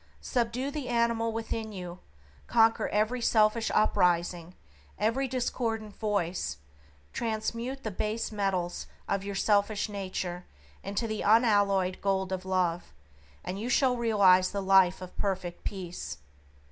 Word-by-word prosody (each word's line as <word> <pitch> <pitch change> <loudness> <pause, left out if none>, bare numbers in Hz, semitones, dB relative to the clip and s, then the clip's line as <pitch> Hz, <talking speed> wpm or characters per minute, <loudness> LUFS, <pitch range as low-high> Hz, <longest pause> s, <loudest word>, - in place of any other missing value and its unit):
Subdue 250 +2 -1
the 290 -3 -4
animal 235 -1 +1
within 225 0 -4
you; 180 -2 -7 0.5
conquer 225 0 +3
every 220 +4 0
selfish 220 0 +3
uprising, 175 -3 +1 0.4
every 240 +6 +1
discordant 230 -4 -2
voice; 180 - -1 0.6
transmute 235 +4 -3
the 220 - -3
base 215 +4 -2
metals 195 -4 -2 0.2
of 200 -1 -1
your 200 0 -5
selfish 205 +1 +1
nature 185 -3 -4 0.4
into 200 +4 -2
the 215 -1 -3
unalloyed 205 -4 +3
gold 190 -1 0
of 185 0 -3
Love, 180 -2 0 0.5
and 185 +2 -4
you 230 +4 -3
shall 255 0 +3
realize 200 -6 +4
the 200 - -3
Life 190 -1 +4
of 180 - -10
Perfect 185 -3 -2
Peace. 180 -3 -5
205 Hz, 125 wpm, -29 LUFS, 185-230 Hz, 0.6 s, realize